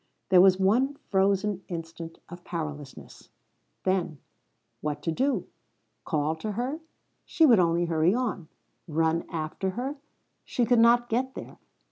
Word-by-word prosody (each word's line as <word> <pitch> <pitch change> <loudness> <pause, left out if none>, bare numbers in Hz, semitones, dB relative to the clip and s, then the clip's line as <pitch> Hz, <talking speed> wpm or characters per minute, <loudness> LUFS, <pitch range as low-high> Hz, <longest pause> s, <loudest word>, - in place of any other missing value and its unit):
There 185 -2 +7
was 190 0 +5
one 245 +9 +2
frozen 195 0 +1
instant 165 -1 -7
of 175 +1 -11
powerlessness. 150 -5 -7 0.5
Then 185 -5 0 0.6
what 150 -1 -4
to 165 - 0
do? 265 - 0 0.6
Call 155 -1 0
to 210 +5 -4
her? 255 +8 -3 0.4
She 325 -3 +3
would 235 -8 +6
only 170 0 +2
hurry 165 +3 +2
on. 215 -9 -2 0.4
Run 165 +1 0
after 160 +4 -3
her? 270 +4 -3 0.5
She 245 - 0
could 245 0 +3
not 240 +1 +5
get 255 +3 -1
there. - - -9
190 Hz, 135 wpm, -27 LUFS, 165-235 Hz, 0.6 s, There